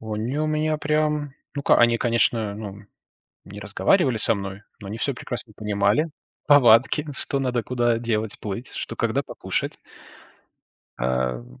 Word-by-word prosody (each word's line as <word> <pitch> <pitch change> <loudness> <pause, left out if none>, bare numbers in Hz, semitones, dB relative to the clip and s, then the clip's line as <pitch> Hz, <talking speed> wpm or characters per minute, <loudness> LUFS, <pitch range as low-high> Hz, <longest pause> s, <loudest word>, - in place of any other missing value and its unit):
Они 110 +5 -3
у 155 - +1
меня 155 0 0
прям, 150 -2 0 0.2
ну 140 - -3
ка - - +5
они, 120 0 +5
конечно, 115 -3 +1
ну, 105 -1 -8 0.6
не 105 +1 -10
разговаривали 120 - +2
со 115 - +3
мной, 100 +1 -6 0.2
но 100 - -9
они 110 +3 -5
всё 140 - -1
прекрасно 120 -2 -5
понимали. 105 +9 +1 0.4
Повадки, 130 +1 +6
что 140 +1 -1
надо, 125 -3 0
куда, 120 -1 +1
делать 110 -2 -2
плыть, 105 +4 -5
что - - -5
когда - - 0
покушать. - - -3 1.2
А, 65 +1 0
м, - - -15
115 Hz, 150 wpm, -24 LUFS, 105-140 Hz, 1.2 s, Повадки